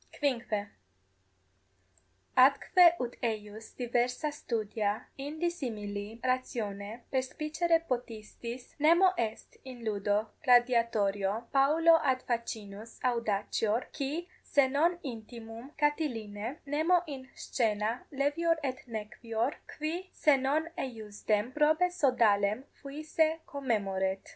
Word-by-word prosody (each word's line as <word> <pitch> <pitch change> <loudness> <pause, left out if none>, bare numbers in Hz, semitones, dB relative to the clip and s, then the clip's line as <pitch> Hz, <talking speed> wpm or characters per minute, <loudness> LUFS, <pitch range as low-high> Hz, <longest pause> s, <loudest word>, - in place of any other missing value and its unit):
=5.= 235 -7 0 1.7
Atque 335 +7 +6
ut 245 -1 -3
eius 215 -1 -4
diversa 245 +4 0
studia 215 -6 -2
in 285 +3 -5
dissimili 225 - -3
ratione 230 -4 -2
perspicere 310 +5 0
possitis, 240 0 -5
nemo 340 +5 +6
est 225 -7 -4
in 255 -3 -9
ludo 205 0 0
gladiatorio 230 -5 +3
paulo 320 +4 +5
ad 260 -2 +1
facinus 225 -2 -5
audacior, 225 -1 0
qui 300 +5 -3
se 280 -2 +3
non 320 +6 +2
intimum 230 0 -8
Catilinae, 250 -6 -1
nemo 320 +5 +2
in 270 -4 -8
scaena 220 -1 -1
levior 295 +4 +1
et 260 -1 -2
nequior, 230 +2 -3 0.2
qui 335 +5 -3
se 300 -2 +4
non 280 +4 +1
eiusdem 215 -2 -2
prope 310 +5 +3
sodalem 230 - +3
fuisse 310 +3 -1
commemoret. 195 -8 -1
245 Hz, 95 wpm, -31 LUFS, 215-295 Hz, 1.7 s, Atque